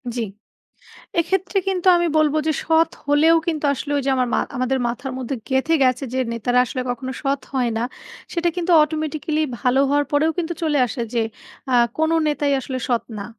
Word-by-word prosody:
জি। 240 - -1 1.0
এক্ষেত্রে 380 +3 0
কিন্তু 375 -1 0
আমি 345 - +1
বলব 305 -2 +3
যে, - - +3
সৎ 325 +1 +3 0.2
হলেও 305 +3 +5
কিন্তু 310 -3 -1
আসলে 285 +2 -5
ওই - - 0
যে 275 - +1
আমার 255 -1 +1
মা - - +3 0.2
আমাদের 255 +1 0
মাথার 250 +3 -4
মধ্যে 260 +1 -3
গেঁথে 265 +5 +1
গেছে 255 +1 +2
যে, 260 - 0
"নেতারা 245 +2 +1
আসলে 255 +1 -4
কখনো 255 +2 -3
সৎ 275 0 0
হয় 250 -3 +1
না।" 225 - -1 0.5
সেটা 345 0 +1
কিন্তু 355 0 -1
automatically 310 0 -1 0.2
ভালো 250 +3 +2
হওয়ার 290 +1 +2
পরেও 305 +3 +3
কিন্তু 345 0 -1
চলে 305 -2 +1
আসে 235 +2 -5
যে, 235 - +2 0.5
আ - - +4 0.2
"কোনো 315 +1 +2
নেতাই 290 -1 0
আসলে 260 0 -5
সৎ 240 -2 +1 0.2
না।" 200 - -5
290 Hz, 190 wpm, -21 LUFS, 255-320 Hz, 1.0 s, হলেও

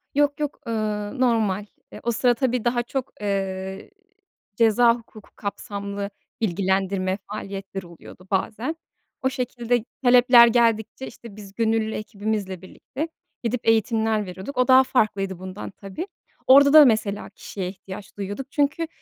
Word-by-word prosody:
Yok, 290 0 +2
yok, 295 -1 -3
ııı, 215 +1 -2
normal. 215 -5 +2 0.3
Eee, - - -9
o 235 - +1
sıra 245 +2 +3
tabii 250 -2 -1
daha 240 0 +1
çok, 265 +2 -4
ııı, 190 -1 -3 0.7
ceza 230 +1 +5
hukuku 225 -3 -14
kapsamlı 200 0 -5 0.3
bilgilendirme 190 -1 0
faaliyetleri 195 -3 -6
oluyordu 175 +2 -14
bazen. 225 - -1 0.5
O 260 - +2
şekilde 245 -2 -1 0.2
talepler 245 -1 +7
geldikçe, 230 +1 +1
işte, 230 -4 -12
biz 200 -2 -11
gönüllü 225 -1 +1
ekibimizle 205 -3 -3
birlikte 270 - -6 0.4
gidip 230 0 -2
eğitimler 220 -1 +2
veriyorduk. 190 +9 -8
O 250 - +3
daha 260 0 +8
farklıydı 195 -7 0
bundan 185 +2 -7
tabii. 200 - -7 0.4
Orada 280 +2 +8
da 310 -1 +10
mesela 215 -4 +1
kişiye 195 -1 -6
ihtiyaç 195 +1 -10
duyuyorduk 205 +7 -5
çünkü 295 +3 0
220 Hz, 135 wpm, -24 LUFS, 195-245 Hz, 0.7 s, da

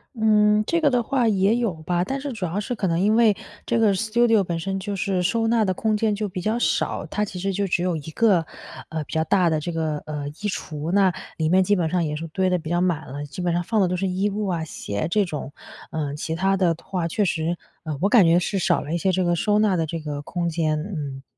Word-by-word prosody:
嗯， 215 -1 +4
这 335 - +2
个 300 -3 +3
的 245 -1 +2
话 245 -1 +1
也 200 +1 +3
有 235 -6 0
吧。 175 +2 -1
但 270 +7 -3
是 285 -1 -4
主 195 -5 -3
要 180 +4 -2
是 245 +4 -3
可 210 - -2
能 170 -2 +1
因 210 +3 +3
为 225 -3 +5 0.3
这 235 - +1
个 210 -3 +4
Studio 225 +1 +3
本 170 -2 -3
身 195 +2 -3
就 200 +1 -4
是 190 -2 0
收 225 +5 +1
纳 225 -2 +3
的 185 - +1
空 215 +3 0
间 215 0 +1
就 210 0 -2
比 180 - -5
较 215 +6 0
少。 - - 0
它 210 - -1
其 185 -2 -7
实 195 +2 -1
就 200 +1 -1
只 175 -1 0
有 180 -1 0
一 155 0 -6
个， 190 -3 +3 0.4
呃， 160 -1 -3
比 - - -13
较 160 0 +2
大 180 0 +3
的 155 -1 +1
这 175 +3 -4
个， 160 -2 -1
呃， 150 -2 -4
衣 - - -8 0.2
橱， 155 -5 -4
那 195 -1 +4 0.3
里 160 -1 0
面 185 +2 +5
基 205 +3 +2
本 170 -4 0
上 175 -1 +1
也 150 0 -2
是 165 +2 -5
堆 185 +4 0
得 180 -1 +1
比 155 - -7
较 175 0 +1
满 175 -4 0
了， 145 +2 -6
基 145 +5 -7
本 175 -1 0
上 175 +1 0
放 215 +3 +1
的 185 - +3
都 180 - -1
是 195 +2 -1
衣 190 +3 0
物 205 +1 -2
啊、 175 -4 -1
鞋 105 -7 -4
这 205 +2 +2
种。 150 -5 -5 0.4
呃， 150 -3 -3
其 160 +2 -3
它 195 +3 +2
的 180 -3 +2
话， 180 -3 -2
确 205 +5 0
实， 170 -1 -1 0.4
我 195 - +4
感 225 -4 +7
觉 165 0 +5
是 190 +2 0
少 - - +2
了 155 - -5
一 - - +1
些 190 - +2
这 185 0 +1
个 175 -1 +2
收 205 +5 +1
纳 210 -3 +3
的 165 - +1
这 165 +1 -4
个 145 -2 -5
空 170 +3 -3
间， 160 -2 0
嗯。 150 -7 -5
185 Hz, 305 characters per minute, -23 LUFS, 165-210 Hz, 0.4 s, 感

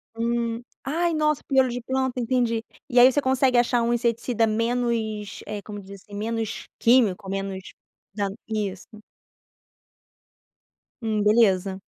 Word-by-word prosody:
Hum. 235 0 -1 0.2
Ai, 335 +5 0
nossa, 305 -2 +1
piolho 265 -2 +3
de 245 0 -4
planta, 260 0 -1
entendi. 235 -2 0 0.3
E 245 -1 +4
aí 255 +2 +8
você 290 - +1
consegue 260 -1 +2
achar 240 0 +3
um 235 +1 +1
inseticida 235 -1 +1
menos, 225 -2 -1
eh, 210 -1 -5
como 205 0 -8
diz, 195 0 -12
assim, 205 - -12
menos 225 0 -3
químico, 215 -5 +3
menos 195 -1 -4 0.4
da 200 -2 -1 0.2
isso. 205 -4 -3 2.1
Hum, 215 -2 0
beleza. 195 -3 +3
230 Hz, 130 wpm, -24 LUFS, 210-245 Hz, 2.1 s, aí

